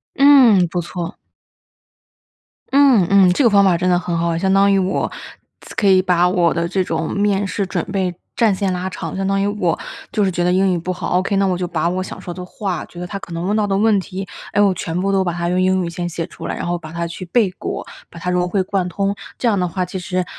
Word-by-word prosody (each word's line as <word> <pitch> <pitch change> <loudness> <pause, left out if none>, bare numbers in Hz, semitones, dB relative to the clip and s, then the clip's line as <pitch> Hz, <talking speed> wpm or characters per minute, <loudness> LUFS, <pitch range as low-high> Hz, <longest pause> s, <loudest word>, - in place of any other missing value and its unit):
嗯， 265 -10 +6
不 175 +1 -2
错。 175 0 -6 1.5
嗯， 265 -9 +5
嗯， 195 -2 +6
这 230 - +1
个 235 - +5
方 200 -1 +5
法 185 -3 +4
真 180 +2 0
的 180 -1 +3
很 175 -1 -3
好。 170 0 0
相 190 +2 +1
当 200 +1 +4
于 195 - +3
我 190 0 -1 0.7
可 205 - +1
以 190 -1 +6
把 180 -1 +2
我 175 -2 +2
的 170 0 -1
这 190 +1 0
种 - - -2
面 200 0 +1
试 200 0 -2
准 180 -3 -2
备 185 -3 -1 0.2
战 225 -4 +3
线 190 0 -1
拉 180 +1 -3
长， 190 - -6
相 195 0 -2
当 195 0 +1
于 - - +1
我 205 -5 0 0.4
就 210 - +1
是 190 - +1
觉 175 -1 -1
得 180 - +2
英 190 +1 +3
语 175 - 0
不 175 +2 -3
好 180 0 -1
，ok， 195 +2 -1
那 195 0 +2
我 180 -2 0
就 180 - -2
把 170 -1 -1
我 185 +1 -1
想 185 - -8
说 175 - -7
的 180 +1 -7
话， 185 0 -4
觉 175 - -11
得 180 - -4
他 195 - -5
可 185 - -10
能 170 +1 -4
问 205 +3 0
到 210 - +1
的 195 -1 0
问 210 0 +3
题， 190 0 -5 0.3
哎， - - +2
我 200 -2 +4
全 165 -1 -4
部 195 +2 0
都 195 -1 +2
把 175 - -1
它 170 0 -2
用 180 +1 +1
英 185 0 +2
语 170 - -4
先 175 0 -4
写 170 -1 -4
出 - - -9
来。 - - -3
然 - - -5
后 175 0 -1
把 160 -1 -10
它 170 0 -3
去 170 +2 -7
背 205 +2 +2
过， - - -5 0.2
把 170 - -12
它 180 0 -2
融 180 0 +1
会 190 +1 +1
贯 185 -1 -1
通， 195 +3 -1 0.2
这 245 - +1
样 205 -3 +2
的 180 - +1
话 180 +2 -2
其 190 - -6
实 180 0 -2
185 Hz, 290 characters per minute, -19 LUFS, 175-195 Hz, 1.5 s, 嗯